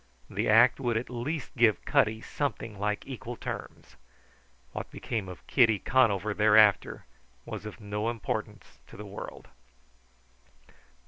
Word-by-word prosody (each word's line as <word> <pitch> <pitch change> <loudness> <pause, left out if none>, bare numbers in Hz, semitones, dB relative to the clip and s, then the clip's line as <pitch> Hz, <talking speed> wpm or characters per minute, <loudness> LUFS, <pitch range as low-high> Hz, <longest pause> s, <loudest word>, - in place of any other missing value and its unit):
The - - -1
act 120 +5 +6
would 120 -4 0
at 120 +2 -4
least 135 +6 -4
give 115 -6 +3
Cutty 110 +1 +2
something 115 -8 -4
like 105 +1 -1
equal 125 -2 -7
terms. - - -8 0.7
What - - -6
became 105 -6 -4
of 90 - -11
Kitty 115 -5 +4
Conover 110 -3 +2
thereafter 105 0 +4 0.4
was 110 - -6
of 105 - -9
no 105 +1 -2
importance 115 -3 -5
to - - -13
the 105 - -8
world. 100 0 -9
110 Hz, 130 wpm, -29 LUFS, 105-120 Hz, 0.7 s, act